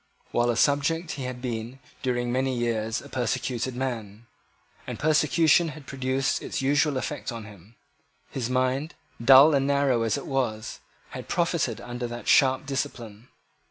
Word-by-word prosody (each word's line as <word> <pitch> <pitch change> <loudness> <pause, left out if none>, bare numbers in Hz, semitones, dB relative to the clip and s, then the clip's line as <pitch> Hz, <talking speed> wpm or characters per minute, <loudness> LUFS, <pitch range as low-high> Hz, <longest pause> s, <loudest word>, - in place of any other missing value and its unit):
While 120 0 +2
a 120 - 0
subject 150 +5 +1
he 135 - -5
had 125 0 -6
been, 120 +1 -4 0.2
during 120 -1 -1
many 130 0 0
years, 115 -2 -1
a - - -11
persecuted 125 0 -2
man; 115 -4 -4 0.6
and - - -5
persecution 155 +1 +3
had 150 -2 -8
produced 130 0 -1
its - - -4
usual 145 +1 +2
effect 140 +1 -4
on 115 -2 -7
him. 105 +1 -15 0.6
His 125 -3 -3
mind, 130 +4 0 0.3
dull 135 +5 +8
and 135 -1 +2
narrow 140 -4 +2
as 115 +4 +1
it 140 - -7
was, 120 -6 -2 0.3
had - - -8
profited 170 - 0
under 120 0 -5
that 120 0 -8
sharp 130 0 +4
discipline. 125 -5 -5
130 Hz, 155 wpm, -26 LUFS, 120-140 Hz, 0.6 s, dull